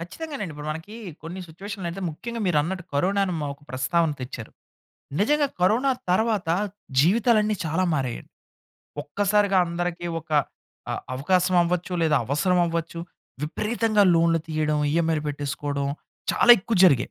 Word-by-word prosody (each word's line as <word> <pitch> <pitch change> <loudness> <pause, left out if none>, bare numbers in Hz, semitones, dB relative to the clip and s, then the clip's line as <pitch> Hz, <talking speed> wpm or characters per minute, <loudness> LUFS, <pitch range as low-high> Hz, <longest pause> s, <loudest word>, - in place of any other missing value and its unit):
ఖచ్చితంగానండి. 210 - -6
ఇప్పుడు 150 +1 -7
మనకీ 165 +7 -7 0.3
కొన్ని 175 +4 -7
సిట్యుయేషన్లయితే 190 +1 -6
ముఖ్యంగా 235 +9 -6
మీరు 165 -5 +3
అన్నట్టు 180 +3 -3
కరోనా 190 +8 +1
అని 185 - -2
మ - - -3
ఒక 140 - -27
ప్రస్తావన 155 +6 +1
తెచ్చారు. 125 -3 -7 0.7
నిజంగా 290 +7 +3
కరోనా 225 +9 +3 0.2
తర్వాత 205 -2 +1 0.5
జీవితాలన్నీ 215 - +3
చాలా 165 +4 0
మారాయండి. 130 -5 -3 0.7
ఒక్కసారిగా 200 +5 +2
అందరికి 175 0 -3
ఒక 160 - -26 0.6
అ - - -1 0.2
అవకాశం 180 +6 +2
అవ్వచ్చు 180 +1 -2
లేదా 155 -2 +3
అవసరం 180 +7 +1
అవ్వచ్చు. 165 0 -3 0.4
విపరీతంగా 215 +6 +1
లోన్లు 165 0 +3
తీయడం. 155 -1 0
ఈఎంఐలు 165 -2 +1
పెట్టేసుకోవడం 145 0 -3 0.5
చాలా - - +4
ఎక్కువ 220 +4 -2
జరిగాయి. 135 -9 +4
175 Hz, 130 wpm, -24 LUFS, 155-200 Hz, 0.7 s, చాలా